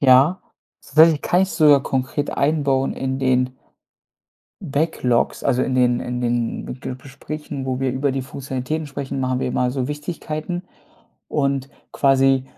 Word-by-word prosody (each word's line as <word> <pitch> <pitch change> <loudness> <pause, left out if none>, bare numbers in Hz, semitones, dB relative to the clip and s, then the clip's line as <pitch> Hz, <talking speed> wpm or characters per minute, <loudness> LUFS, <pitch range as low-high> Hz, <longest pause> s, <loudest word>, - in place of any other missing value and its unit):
Ja, 140 +7 +5 0.4
das 145 - -17
werde 160 +1 +8
ich 145 - -3
kann 180 +2 +3
ich 190 - -1
sogar 145 -4 +5
konkret 135 +3 -2
einbauen 140 -2 +1
in 130 0 -2
den 130 -1 +1 1.1
Backlogs. 140 -5 0
Also 125 +1 +2
in 130 - -1
den 125 -1 +3
in 125 0 -3
den 120 -1 -1
Ge 130 - -5
Gesprächen, 140 +1 -7
wo 130 0 -2
wir 135 -1 +1
über 135 +1 0
die 135 - -2
Funktionalitäten 135 +3 -4
sprechen, 135 -1 -5
machen 130 0 0
wir - - -1
immer 125 0 0
so 130 -1 -2
Wichtigkeiten 155 +3 -4 0.7
und 140 -2 0 0.2
quasi 135 -1 +3
135 Hz, 155 wpm, -21 LUFS, 130-150 Hz, 1.1 s, werde